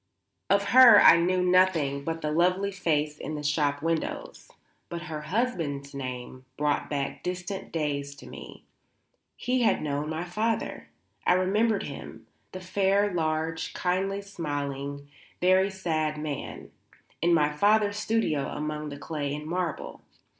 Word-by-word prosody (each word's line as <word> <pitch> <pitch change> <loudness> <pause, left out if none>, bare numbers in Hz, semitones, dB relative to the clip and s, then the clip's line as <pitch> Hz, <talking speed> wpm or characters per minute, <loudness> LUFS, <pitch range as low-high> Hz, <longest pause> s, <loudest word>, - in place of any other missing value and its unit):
Of 200 0 +2
her 255 -1 +9
I 165 - +8
knew 180 +2 +1
nothing 180 -7 +3
but 165 +2 -3
the 150 - -1
lovely 180 +5 +2
face 155 -5 -1
in 155 - -5
the 150 - -5
shop 145 -1 0
windows. 165 -1 -3 0.4
But 170 0 -5
her 155 -3 -5
husband's 150 - -2
name 130 -1 -6
brought 150 -1 0
back 140 -2 -3
distant 180 +2 -5
days 140 -3 -2
to - - -13
me. - - -11 0.7
He 250 0 0
had 230 - +2
known 145 0 -2
my 160 +2 -3
father; 215 +6 -2 0.4
I - - +6
remembered 200 +4 +2
him 115 -5 -9 0.3
the 185 - -7
fair, 195 +2 +1
large, 160 0 -2
kindly 195 +2 -1
smiling, 145 -6 -4 0.3
very 185 +2 +4
sad 160 -5 -2
man 150 -2 -6 0.5
in 170 +2 +3
my 150 -3 +3
father's 205 +6 +2
studio 215 -10 0
among 150 0 -4
the 145 - -7
clay 145 -1 -3
and 150 0 -7
marble. 175 0 -3
165 Hz, 140 wpm, -27 LUFS, 150-190 Hz, 0.7 s, her